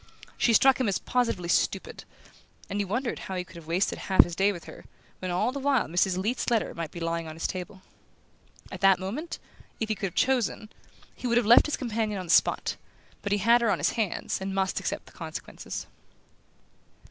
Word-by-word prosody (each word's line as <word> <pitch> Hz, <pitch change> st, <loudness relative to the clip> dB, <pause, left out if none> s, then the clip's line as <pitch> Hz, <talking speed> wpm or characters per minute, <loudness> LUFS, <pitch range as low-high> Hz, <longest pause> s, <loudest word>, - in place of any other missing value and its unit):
She 235 Hz, -, +2 dB
struck 265 Hz, +3 st, +5 dB
him 255 Hz, -, +1 dB
as 195 Hz, -, +1 dB
positively 230 Hz, -8 st, -1 dB
stupid, -, -, 0 dB, 0.7 s
and 205 Hz, +1 st, 0 dB
he -, -, -1 dB
wondered 240 Hz, +6 st, -2 dB
how 190 Hz, -, -6 dB
he 180 Hz, -, -2 dB
could 185 Hz, 0 st, -17 dB
have 165 Hz, -2 st, -11 dB
wasted 175 Hz, +4 st, 0 dB
half 190 Hz, -, +5 dB
his 175 Hz, -, -6 dB
day 195 Hz, +3 st, +3 dB
with 175 Hz, -4 st, -8 dB
her, -, -, -12 dB, 0.3 s
when 185 Hz, -, -4 dB
all 185 Hz, +7 st, +1 dB
the 280 Hz, -, -5 dB
while 275 Hz, -3 st, +2 dB
Mrs. 180 Hz, +2 st, +1 dB
Leath's 220 Hz, +7 st, -1 dB
letter 230 Hz, -3 st, +1 dB
might 165 Hz, -2 st, -4 dB
be 170 Hz, -, -8 dB
lying 165 Hz, 0 st, -2 dB
on 155 Hz, -, -7 dB
his 165 Hz, -, -4 dB
table. 190 Hz, +1 st, -5 dB, 0.9 s
At -, -, -7 dB
that 195 Hz, -1 st, +6 dB
moment, 235 Hz, -, -5 dB, 0.4 s
if 220 Hz, -, -2 dB
he -, -, +2 dB
could 195 Hz, -, -2 dB
have 175 Hz, -, -10 dB
chosen, 245 Hz, -4 st, +1 dB, 0.4 s
he 250 Hz, -, -5 dB
would 235 Hz, 0 st, +2 dB
have 240 Hz, -, +3 dB
left 235 Hz, +7 st, +7 dB
his 300 Hz, -, -1 dB
companion 220 Hz, -4 st, -2 dB
on 185 Hz, -, -5 dB
the 170 Hz, -, -2 dB
spot; -, -, +3 dB, 0.4 s
but 205 Hz, -, -4 dB
he 205 Hz, -, +3 dB
had 230 Hz, +4 st, +4 dB
her 230 Hz, -, +2 dB
on -, -, +2 dB
his -, -, +1 dB
hands, 215 Hz, -4 st, -2 dB
and 190 Hz, 0 st, -3 dB
must 190 Hz, -1 st, 0 dB
accept -, -, -3 dB
the -, -, -16 dB
consequences. -, -, -7 dB
200 Hz, 215 wpm, -27 LUFS, 185-235 Hz, 0.9 s, left